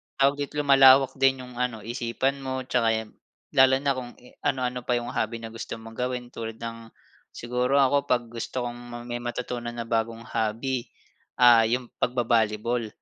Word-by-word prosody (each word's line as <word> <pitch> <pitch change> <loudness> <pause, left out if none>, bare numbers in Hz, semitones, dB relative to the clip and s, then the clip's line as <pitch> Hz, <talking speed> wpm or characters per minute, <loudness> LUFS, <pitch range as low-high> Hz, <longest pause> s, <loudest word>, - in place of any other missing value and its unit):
tawag 140 +1 +2
dito 145 +1 -4
lumalawak 135 -1 +7
din 135 -1 +3
'yong 125 -1 -10
ano 125 -4 -2
isipan 120 +4 -2
mo, 130 -1 -4
tsaka 115 -3 +1
yun 105 - -17 0.4
lalo 130 0 +6
na 140 - +3
kung 120 -1 -6 0.3
anu-ano 125 -1 0
pa 125 - +2
yung 120 0 -2
hobby 115 +1 -2
na 115 - -5
gusto 115 - -6
mong 115 0 -12
gawin 125 -1 -3
tulad 115 -2 -6
ng 115 0 -7 0.5
siguro 125 +3 -1
ako 140 +1 +2
'pag 125 -1 +2
gusto 120 +2 -4
kong 120 0 -7
may 120 - -2
matutunan 120 0 -4
na 115 - -3
bagong 115 0 -2
hobby, 115 +4 -2 0.5
ah, 120 -2 +6
yung 125 +1 -2
pag-ba-volleyball, 115 -1 +1
120 Hz, 165 wpm, -26 LUFS, 115-130 Hz, 0.5 s, lumalawak